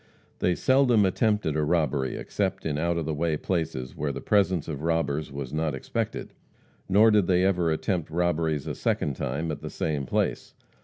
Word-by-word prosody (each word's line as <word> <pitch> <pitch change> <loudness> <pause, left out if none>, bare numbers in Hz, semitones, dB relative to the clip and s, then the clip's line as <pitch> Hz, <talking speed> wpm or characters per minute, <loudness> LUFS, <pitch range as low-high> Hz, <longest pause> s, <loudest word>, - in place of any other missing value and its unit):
They 90 - +2
seldom 130 -4 +4
attempted 105 -4 +1
a 75 - +1
robbery 75 -4 0
except - - -2
in 75 -2 -1
out 85 +1 0
of 85 - -2
the 80 - -2
way 80 0 0
places 80 -8 -3
where 75 0 -2
the - - -5
presence 95 -6 +1
of 75 -3 -5
robbers 80 -3 -1
was 70 -1 -6
not 75 -2 -1
expected. 65 - -4 0.6
Nor 110 +4 +6
did 105 -4 +3
they 90 0 +3
ever 90 -3 +2
attempt 85 +1 -1
robberies 80 -3 0
a - - -3
second 70 - -1
time 80 +7 -2
at 75 - -6
the - - -5
same 75 -4 -2
place. - - -1
80 Hz, 185 wpm, -26 LUFS, 75-90 Hz, 0.6 s, Nor